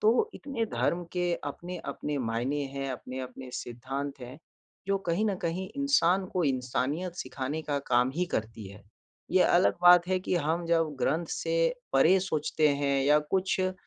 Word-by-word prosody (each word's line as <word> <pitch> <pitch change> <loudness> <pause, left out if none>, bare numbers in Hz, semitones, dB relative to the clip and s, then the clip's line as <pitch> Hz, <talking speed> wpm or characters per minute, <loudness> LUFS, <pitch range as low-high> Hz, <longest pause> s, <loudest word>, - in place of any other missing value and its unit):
तो 245 - +3
इतने 270 -5 -3
धर्म 175 +1 0
के 180 -1 0
अपने-अपने 175 -4 -5
मायने 125 +4 -1
हैं, 135 0 -3
अपने-अपने 130 0 -7
सिद्धांत 135 +3 -5
हैं, 125 +4 -9 0.5
जो 195 0 +1
कहीं 175 +6 +1
न 200 -3 0
कहीं 180 +3 -2
इंसान 195 -10 +3
को 180 - +1
इंसानियत 140 +6 -1
सिखाने 135 +3 -4
का 145 -2 -1
काम 125 +1 +3
ही 180 +3 +1
करती 110 -1 -3
है। 100 +1 -13 0.5
ये 185 - +5
अलग 175 +2 +4
बात 175 0 +8
है 185 0 +2
कि 185 - -2
हम 165 +2 0
जब 165 -2 +1
ग्रंथ 165 +7 +1
से - - -2 0.4
परे 185 +4 +5
सोचते 155 -3 +1
हैं 140 -1 +1
या 150 +2 +5 0.2
कुछ 190 0 +1
अ, 185 0 +1
155 Hz, 165 wpm, -29 LUFS, 130-180 Hz, 0.5 s, बात